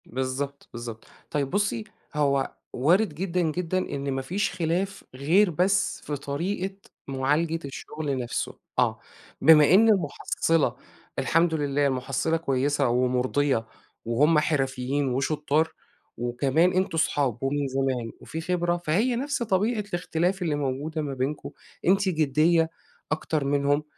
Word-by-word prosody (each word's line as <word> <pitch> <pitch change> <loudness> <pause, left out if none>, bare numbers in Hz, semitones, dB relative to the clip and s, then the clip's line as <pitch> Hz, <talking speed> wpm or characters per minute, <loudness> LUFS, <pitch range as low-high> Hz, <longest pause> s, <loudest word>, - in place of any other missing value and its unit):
بالضبط، 130 +3 -4
بالضبط، 115 -2 -7 0.3
طيب 140 -2 0
بُصّي 205 +4 0 0.3
هو 140 -2 +1 0.2
وارد 180 - +3
جدًا، 180 +1 -1
جدًا، 170 +2 -1
إن 140 -6 -2
ما 135 0 -1
فيش 185 +10 -1
خلاف 180 +3 -2
غير 170 +10 +3
بس 185 +4 +1
في 150 - -3
طريقة 180 +8 -3 0.3
معالجة 145 +5 0
الشغل 145 0 -4
نفْسه، 120 -2 -3 0.3
آه، - - +2 0.4
بما 155 0 +7
إن 225 +4 +7
المُحَصِّلة 165 -5 +1 0.4
الحمد 165 0 +2
لله 145 -2 +1
المُحَصِّلة 135 +5 0
كويسة 140 -2 +1
ومُرضية 125 +1 +1 0.4
وهُم 150 +7 +4
حرفيين 135 -2 0
وشطار، 150 +4 0 0.4
وكمان 135 +8 +2
أنتم 185 -2 0
صحاب 135 -6 0
ومن 140 +1 0
زمان 130 -3 -1
وفي 160 - -6
خبرة، 175 0 0
فهي 220 +11 +2
نفْس 275 0 -1
طبيعة 210 +2 +1
الاختلاف 180 +1 -1
اللي 160 -4 0
موجودة 145 +3 -2
ما 145 -2 -3
بينكم، 135 +3 -3 0.4
أنتِ 195 +1 +4
جديّة 160 +1 +3 0.4
اكتر 155 -2 -1
منهم، 145 +1 +2
150 Hz, 125 wpm, -26 LUFS, 135-175 Hz, 0.4 s, بما